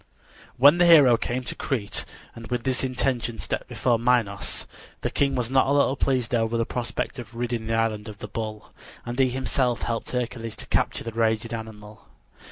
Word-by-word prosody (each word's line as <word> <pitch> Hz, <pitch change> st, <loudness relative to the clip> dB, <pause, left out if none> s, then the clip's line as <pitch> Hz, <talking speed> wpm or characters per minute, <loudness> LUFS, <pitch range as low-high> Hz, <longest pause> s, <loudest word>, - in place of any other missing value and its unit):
When 145 Hz, +7 st, +7 dB
the 175 Hz, -, +6 dB
hero 145 Hz, -8 st, +8 dB
came 125 Hz, +2 st, -2 dB
to -, -, -5 dB
Crete 115 Hz, -7 st, -2 dB, 0.3 s
and 115 Hz, -1 st, -10 dB
with 125 Hz, -1 st, -2 dB
this 130 Hz, +1 st, 0 dB
intention 125 Hz, -3 st, -1 dB
stepped -, -, -3 dB
before 120 Hz, -2 st, +1 dB
Minos, 115 Hz, -5 st, 0 dB, 0.4 s
the -, -, -2 dB
king 140 Hz, -1 st, +1 dB
was 125 Hz, -1 st, -1 dB
not 130 Hz, 0 st, +4 dB
a -, -, +1 dB
little 140 Hz, -1 st, +3 dB
pleased 130 Hz, -4 st, 0 dB
over 115 Hz, 0 st, +1 dB
the 115 Hz, -, +1 dB
prospect 125 Hz, +2 st, -3 dB
of 115 Hz, -1 st, -9 dB
ridding 120 Hz, -2 st, -3 dB
the 115 Hz, -, 0 dB
island 110 Hz, -1 st, 0 dB
of 105 Hz, -2 st, -8 dB
the -, -, -7 dB
bull, 110 Hz, -2 st, -6 dB, 0.3 s
and 120 Hz, +2 st, -5 dB
he 130 Hz, -1 st, +4 dB
himself 125 Hz, -1 st, -1 dB
helped 115 Hz, -1 st, -2 dB
Hercules 120 Hz, -2 st, -3 dB
to -, -, -8 dB
capture -, -, 0 dB
the 115 Hz, -, -5 dB
raging 115 Hz, 0 st, 0 dB
animal. 110 Hz, -2 st, -9 dB
120 Hz, 190 wpm, -25 LUFS, 115-130 Hz, 0.4 s, hero